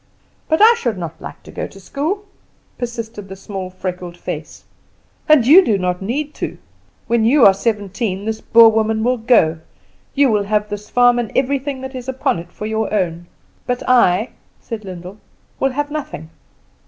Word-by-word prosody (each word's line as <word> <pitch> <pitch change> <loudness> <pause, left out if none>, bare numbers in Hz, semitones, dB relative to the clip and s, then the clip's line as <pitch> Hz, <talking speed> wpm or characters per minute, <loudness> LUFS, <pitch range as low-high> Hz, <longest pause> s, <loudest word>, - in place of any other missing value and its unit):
"But 320 +5 +4
I 455 +2 +8
should 235 -6 -2
not 170 -2 -7
like - - -9
to - - -12
go - - -4
to 195 - -15
school!" 315 - -3 0.5
persisted 230 -4 -6
the 190 - -7
small 195 -1 -6
freckled 180 -1 -6
face. - - -7 0.7
"And 300 -6 +6
you 335 +9 +8
do 220 - +1
not 180 -1 -2
need 285 +9 -3
to. - - -3 0.5
When 235 -1 +1
you 255 +4 +5
are 195 - +8
seventeen 200 -1 -2
this 220 0 -3
Boer 230 0 +7
woman 220 0 0
will 250 +1 +1
go; 215 -9 +3 0.6
you 280 -3 +4
will 205 -2 +1
have 210 0 0
this 205 0 -7
farm 245 0 +4
and 230 -4 -3
everything 275 0 -1
that 265 0 -7
is 255 0 -6
upon 260 -9 -1
it 170 +1 -11
for 210 - -7
your 220 0 -2
own; 175 -4 -1 0.4
but 250 0 -2
I," 230 -3 +3 0.3
said 220 -3 -7
Lyndall, 185 +2 -9 0.4
"will 270 -1 +1
have 290 +2 -2
nothing. 270 - -6
220 Hz, 180 wpm, -18 LUFS, 195-255 Hz, 0.7 s, I